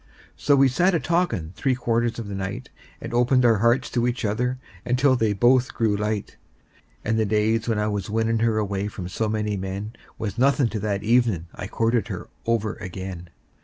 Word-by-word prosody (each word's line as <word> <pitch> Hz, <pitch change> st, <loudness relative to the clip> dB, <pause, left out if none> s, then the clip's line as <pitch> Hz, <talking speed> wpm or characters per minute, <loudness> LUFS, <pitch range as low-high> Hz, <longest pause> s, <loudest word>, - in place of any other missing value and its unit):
And -, -, -30 dB
so 145 Hz, -, +3 dB
we 135 Hz, 0 st, +5 dB
sat 175 Hz, +9 st, +2 dB
a -, -, +2 dB
talkin' 155 Hz, -, -1 dB
three 130 Hz, -2 st, +1 dB
quarters 120 Hz, -1 st, 0 dB
of 115 Hz, -3 st, -5 dB
the 100 Hz, -, -6 dB
night, 95 Hz, 0 st, -5 dB, 0.3 s
And -, -, -7 dB
opened 125 Hz, +1 st, +3 dB
our 115 Hz, -4 st, +4 dB
hearts 120 Hz, +3 st, +3 dB
to 120 Hz, -1 st, +1 dB
each 120 Hz, -2 st, -2 dB
other 125 Hz, +5 st, 0 dB, 0.3 s
until 125 Hz, +2 st, +3 dB
they 110 Hz, -3 st, +1 dB
both 120 Hz, +5 st, +3 dB
grew 110 Hz, -3 st, +1 dB
light; 105 Hz, 0 st, -3 dB, 0.7 s
And 110 Hz, 0 st, +1 dB
the 110 Hz, -, +2 dB
days 110 Hz, +2 st, +1 dB
when 110 Hz, -, +1 dB
I 105 Hz, -, +1 dB
was 105 Hz, -2 st, -3 dB
winnin' 115 Hz, +1 st, +1 dB
her 115 Hz, -1 st, +2 dB
away 100 Hz, -1 st, -1 dB
from 95 Hz, -3 st, -6 dB
so 110 Hz, +4 st, -2 dB
many 105 Hz, -1 st, -1 dB
men 95 Hz, +3 st, -5 dB, 0.2 s
Was 110 Hz, +1 st, -4 dB
nothin' 135 Hz, -1 st, +3 dB
to 110 Hz, -, -3 dB
that 100 Hz, -1 st, -2 dB
evenin' 110 Hz, -8 st, +2 dB
I -, -, -6 dB
courted 115 Hz, -1 st, 0 dB
her -, -, -6 dB, 0.2 s
over 110 Hz, -2 st, 0 dB
again. 90 Hz, -2 st, -7 dB
110 Hz, 200 wpm, -24 LUFS, 105-120 Hz, 0.7 s, we